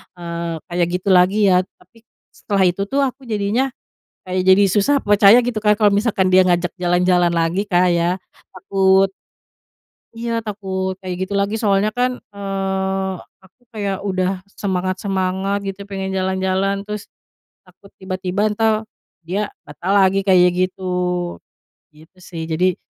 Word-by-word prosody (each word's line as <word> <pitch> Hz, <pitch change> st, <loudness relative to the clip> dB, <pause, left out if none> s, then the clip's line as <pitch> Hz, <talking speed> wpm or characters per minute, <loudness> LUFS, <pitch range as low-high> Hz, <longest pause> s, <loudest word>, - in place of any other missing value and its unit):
eee, 170 Hz, -1 st, -5 dB
kayak 175 Hz, -1 st, 0 dB
gitu 195 Hz, -, -3 dB
lagi, 190 Hz, +3 st, +4 dB
ya. 180 Hz, -, +5 dB, 0.2 s
Tapi 230 Hz, -1 st, -24 dB, 0.3 s
setelah 195 Hz, -2 st, 0 dB
itu 180 Hz, +3 st, -1 dB
tuh 280 Hz, +4 st, 0 dB
aku 265 Hz, 0 st, -4 dB
jadinya, 215 Hz, +5 st, 0 dB, 0.6 s
kayak 185 Hz, 0 st, -1 dB
jadi 195 Hz, +2 st, +6 dB
susah 215 Hz, +9 st, +2 dB
percaya, 205 Hz, +3 st, +6 dB
gitu 240 Hz, -3 st, -2 dB
kan, 210 Hz, 0 st, +4 dB
kalo 210 Hz, -2 st, +4 dB
misalkan 200 Hz, -3 st, +1 dB
dia 185 Hz, -, +7 dB
ngajak 175 Hz, -1 st, +1 dB
jalan-jalan 175 Hz, 0 st, +2 dB
lagi 170 Hz, +5 st, 0 dB
Kak 180 Hz, -1 st, +3 dB
ya, 170 Hz, +2 st, +1 dB, 0.4 s
takut. 190 Hz, +1 st, +2 dB, 1.1 s
Iya, 230 Hz, 0 st, -2 dB
takut 190 Hz, -3 st, -4 dB
kayak 185 Hz, -1 st, -5 dB
gitu 200 Hz, -, -6 dB
lagi, 200 Hz, +2 st, 0 dB
soalnya 205 Hz, 0 st, +2 dB
kan, 250 Hz, 0 st, 0 dB, 0.2 s
eee, 190 Hz, -1 st, -2 dB, 0.3 s
aku 190 Hz, +7 st, -24 dB
kayak 200 Hz, -3 st, -3 dB
udah 185 Hz, -1 st, -1 dB, 0.2 s
semangat-semangat 190 Hz, 0 st, -1 dB
gitu, 195 Hz, 0 st, -6 dB
pengen 195 Hz, -1 st, -4 dB
jalan-jalan. 190 Hz, +1 st, -1 dB
Terus, 210 Hz, 0 st, -6 dB, 0.6 s
takut 200 Hz, -, -20 dB
tiba-tiba 190 Hz, +2 st, -2 dB
entar, 220 Hz, +1 st, +1 dB, 0.5 s
dia, 190 Hz, +5 st, -3 dB, 0.2 s
batal 175 Hz, +6 st, -4 dB
lagi, 195 Hz, 0 st, +3 dB
kayak 185 Hz, -2 st, +5 dB
gitu. 185 Hz, +1 st, -2 dB, 1.1 s
Gitu 160 Hz, +3 st, -21 dB
sih, 165 Hz, -2 st, -7 dB
jadi 175 Hz, +3 st, 0 dB
190 Hz, 140 wpm, -19 LUFS, 185-205 Hz, 1.1 s, dia